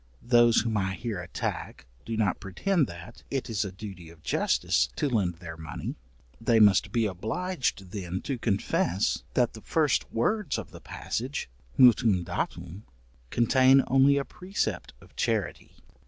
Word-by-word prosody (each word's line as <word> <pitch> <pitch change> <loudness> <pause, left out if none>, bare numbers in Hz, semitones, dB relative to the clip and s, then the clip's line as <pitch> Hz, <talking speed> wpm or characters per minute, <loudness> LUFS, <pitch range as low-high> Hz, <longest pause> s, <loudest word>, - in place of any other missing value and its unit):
Those 120 -1 +5
whom 110 -1 -1
I 95 -1 -1
here 110 -3 -4
attack 85 -5 -5 0.2
do 115 -1 -3
not 105 -4 +1
pretend 145 - 0
that 90 +7 -11
it 135 -4 -3
is 110 -1 0
a 100 - -5
duty 95 -3 -9
of 80 -2 -17
justice - - +1
to - - 0
lend 100 -9 0
their 85 -1 -9
money; 80 -2 -6 0.5
they 115 -2 +4
must 105 -3 +5
be 115 -2 +1
obliged 110 - -2
then 95 -3 -4
to 135 -4 -3
confess, 100 -3 0
that 125 -2 +2
the 110 - -10
first 155 0 +1
words 190 - 0
of - - -7
the - - -12
passage, 125 - -4 0.3
mutuum 115 -7 +5
date, 90 +2 -4 0.5
contain 130 - +5
only 135 +2 +4
a 140 - -1
precept 190 +3 -3
of - - -19
charity. - - -2
110 Hz, 155 wpm, -28 LUFS, 95-130 Hz, 0.5 s, Those